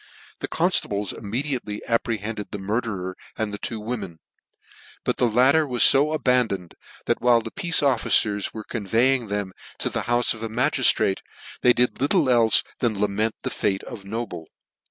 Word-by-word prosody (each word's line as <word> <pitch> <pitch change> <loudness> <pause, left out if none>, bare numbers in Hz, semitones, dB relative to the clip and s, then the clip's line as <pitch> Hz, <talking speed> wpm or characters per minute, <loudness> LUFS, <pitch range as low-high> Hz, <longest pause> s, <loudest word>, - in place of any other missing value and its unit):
The - - -4
conftables 100 -1 0
immediately 115 -1 -3
apprehended 115 -2 -2
the - - -5
murderer 100 -2 -3 0.2
and 110 -2 -2
the 100 - -5
two 115 - -4
women; 105 -6 -5 0.9
but - - -1
the 125 - +3
latter 135 +7 +4
were 125 -2 -3
fo 150 +6 +5
aban 125 -4 +3
doned, 90 -4 -6 0.3
that - - 0
while 120 -1 +5
the 115 0 -7
pea. 195 -3 -6
e 165 -3 +3
officers 110 -5 +1
were 110 - -7
convey 115 +4 +1
ing 125 -4 -2
them 100 -2 -3 0.2
to - - -2
the - - -3
houfe 120 0 +2
of 110 - -11
a 115 - -3
magistrate, 110 -4 +2 0.4
they 125 - +6
did 125 +1 +1
little 145 0 +2
elfe 115 -3 +5 0.2
than 110 -5 -1
lament 105 +2 0
the - - -2
fate 95 -1 -1
or 115 - -8
Noble. 100 -6 -6
115 Hz, 175 wpm, -23 LUFS, 105-125 Hz, 0.9 s, they